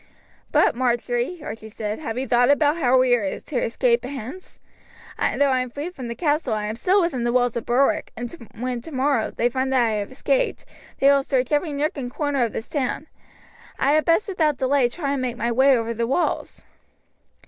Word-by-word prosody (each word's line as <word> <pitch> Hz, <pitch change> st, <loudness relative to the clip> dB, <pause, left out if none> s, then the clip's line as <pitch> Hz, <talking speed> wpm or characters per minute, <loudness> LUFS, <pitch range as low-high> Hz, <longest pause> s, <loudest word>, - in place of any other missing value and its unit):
"But, -, -, +4 dB
Marjory," 245 Hz, +5 st, -1 dB
Archie 220 Hz, -2 st, -7 dB
said, 210 Hz, -1 st, -4 dB
"have 235 Hz, -7 st, -5 dB
you 265 Hz, +1 st, -2 dB
thought 245 Hz, +2 st, +3 dB
how 290 Hz, -4 st, +3 dB
we 255 Hz, -1 st, +4 dB
are 205 Hz, -6 st, 0 dB
to 260 Hz, -5 st, -3 dB
escape 235 Hz, +1 st, +1 dB
hence; 270 Hz, +7 st, -8 dB, 0.6 s
though 285 Hz, -1 st, +2 dB
I 260 Hz, -, +2 dB
am 255 Hz, 0 st, -2 dB
free 290 Hz, +8 st, -5 dB
from 260 Hz, -9 st, -7 dB
the 235 Hz, -, -5 dB
castle 295 Hz, -6 st, 0 dB
I 210 Hz, -1 st, -2 dB
am 215 Hz, +1 st, -3 dB
still 365 Hz, -, +2 dB
within 300 Hz, -9 st, -1 dB
the 240 Hz, -, +1 dB
walls 245 Hz, -1 st, +2 dB
of 235 Hz, -, -4 dB
Berwick, 255 Hz, +3 st, +2 dB
and 240 Hz, 0 st, -5 dB, 0.3 s
when, 245 Hz, 0 st, -3 dB
tomorrow, 270 Hz, -3 st, 0 dB
they 235 Hz, -, 0 dB
find 260 Hz, +2 st, -1 dB
that 255 Hz, -2 st, +3 dB
I -, -, 0 dB
have 205 Hz, -1 st, -3 dB
escaped, -, -, -1 dB, 0.3 s
they 275 Hz, +1 st, +5 dB
will 280 Hz, 0 st, +4 dB
search 260 Hz, -1 st, -1 dB
every 300 Hz, +2 st, +1 dB
nook 290 Hz, +2 st, -1 dB
and 250 Hz, -3 st, -4 dB
corner 285 Hz, -2 st, 0 dB
of 230 Hz, -, -2 dB
the -, -, -4 dB
town. 285 Hz, +2 st, -3 dB, 0.7 s
I 275 Hz, -, +2 dB
had 310 Hz, +1 st, +3 dB
best 335 Hz, +6 st, +3 dB
without 315 Hz, -7 st, +1 dB
delay 260 Hz, -1 st, +2 dB
try 280 Hz, +1 st, -3 dB
and 275 Hz, -, -2 dB
make 245 Hz, -2 st, -3 dB
my 235 Hz, 0 st, -1 dB
way 265 Hz, +2 st, +5 dB
over 230 Hz, 0 st, -2 dB
the 230 Hz, 0 st, -2 dB
walls." 270 Hz, +8 st, -1 dB
255 Hz, 205 wpm, -23 LUFS, 240-290 Hz, 0.7 s, they